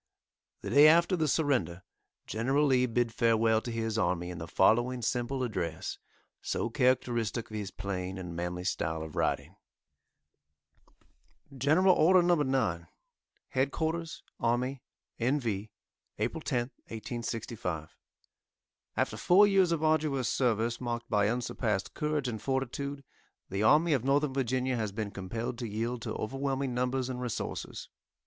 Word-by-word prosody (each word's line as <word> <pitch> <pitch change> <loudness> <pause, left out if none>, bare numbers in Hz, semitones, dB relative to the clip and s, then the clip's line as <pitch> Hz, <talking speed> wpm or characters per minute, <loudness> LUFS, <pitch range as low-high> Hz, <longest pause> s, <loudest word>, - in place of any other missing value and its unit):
The - - -5
day 145 +2 +8
after 170 +4 +5
the 160 -3 0
surrender 130 - 0 0.4
General 135 +7 +1
Lee 130 -2 +3
bid 120 -1 0
farewell 115 -1 +3
to 120 - -5
his 115 -1 -1
army 90 -3 0
in 90 - -7
the 80 - -6
following 120 +7 +2
simple 125 +3 -1
address, 90 -9 -3 0.4
so 115 - -2
characteristic 120 -3 +1
of - - -6
his 105 -3 -3
plain 95 -1 -4
and 90 -2 -6
manly 90 +1 -3
style 80 -3 -2
of 80 -1 -9
writing: - - -1 2.0
GENERAL 155 +8 +4
ORDER,} 180 +2 +5
NO. 175 0 +4
9.} 130 - 0 0.7
HEADQ'RS 160 +5 -1 0.2
ARMY 125 +3 0 0.4
N. 130 +5 +2
V.,} 110 -4 -3 0.5
APRIL - - -2
10th, 120 +1 -1 0.2
1865. 110 -8 -5 0.5
} - - -44
After - - 0
four 190 +4 +6
years 195 -3 +4
of 165 -2 0
arduous 155 -5 +2
service, 115 -1 0
marked 120 -1 -4
by 105 -2 +3
unsurpassed 115 -4 -2
courage 150 -3 -1
and 110 -4 -4
fortitude, 135 +2 -2 0.5
the 100 +2 -1
Army 155 +9 +5
of 130 -5 +1
Northern 140 +1 +2
Virginia 130 -1 0
has 110 -3 -2
been 105 0 -4
compelled 115 +6 -4
to 120 -3 -4
yield 115 +3 -2
to - - -4
overwhelming 135 +2 -2
numbers 125 +1 0
and 125 -1 -4
resources. 125 -3 -4
120 Hz, 140 wpm, -30 LUFS, 110-140 Hz, 2.0 s, day